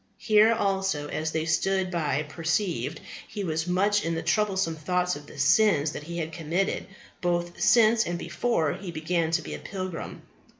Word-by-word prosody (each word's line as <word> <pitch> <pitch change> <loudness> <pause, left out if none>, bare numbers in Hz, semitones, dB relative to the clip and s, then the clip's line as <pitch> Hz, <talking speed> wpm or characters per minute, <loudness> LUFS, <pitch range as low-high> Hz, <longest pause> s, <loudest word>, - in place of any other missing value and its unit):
Here 215 0 +5
also, 195 -7 0
as 160 0 -2
they 160 0 -1
that 160 - 0
stood 190 +2 +1
by 155 -4 0
perceived, 165 +5 -2 0.3
he 205 - -5
was 160 -1 -2
much 200 +3 +2
in 165 0 -1
the 165 - -3
troublesome 195 -6 +1
thoughts 180 +3 0
of 145 0 -10
the - - -13
sins 150 0 +4
that - - -6
he 170 +3 -7
had 160 -1 -3
committed, 170 +4 -1 0.3
both 175 -1 -1
since 230 -1 +5
and 175 0 -2
before 170 -5 0
he 190 +1 -7
began 165 0 -1
to 165 0 0
be - - -6
a - - -5
pilgrim. 185 -4 -6
175 Hz, 180 wpm, -27 LUFS, 160-195 Hz, 0.3 s, Here